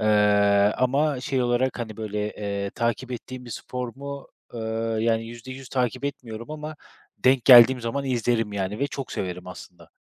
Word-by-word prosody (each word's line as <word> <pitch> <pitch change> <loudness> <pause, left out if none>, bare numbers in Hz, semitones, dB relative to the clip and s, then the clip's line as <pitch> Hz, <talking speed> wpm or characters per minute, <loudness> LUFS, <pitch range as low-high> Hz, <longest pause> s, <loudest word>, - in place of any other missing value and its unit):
Eee, 105 -1 +4
ama 135 +2 +1
şey 130 -1 0
olarak 120 +1 +1
hani 110 -3 -5
böyle, 105 -1 -4 0.2
eee, 100 -1 -3
takip 120 +2 -2
ettiğim 125 +1 -7
bir 120 - -10
spor 125 +2 -5
mu? 140 0 -7 0.3
Eee, 115 - -5 0.4
yani 115 0 +1
%100 130 +3 -9
takip 125 +1 -1
etmiyorum 120 -4 -6
ama 155 0 -6 0.4
denk 130 -1 +3
geldiğim 125 0 +9
zaman 140 +4 -2
izlerim 120 -4 0
yani 100 +2 -3
ve 140 - +1
çok 135 -2 -6
severim 90 -1 -4
aslında. 90 -1 -12
120 Hz, 160 wpm, -25 LUFS, 105-130 Hz, 0.4 s, geldiğim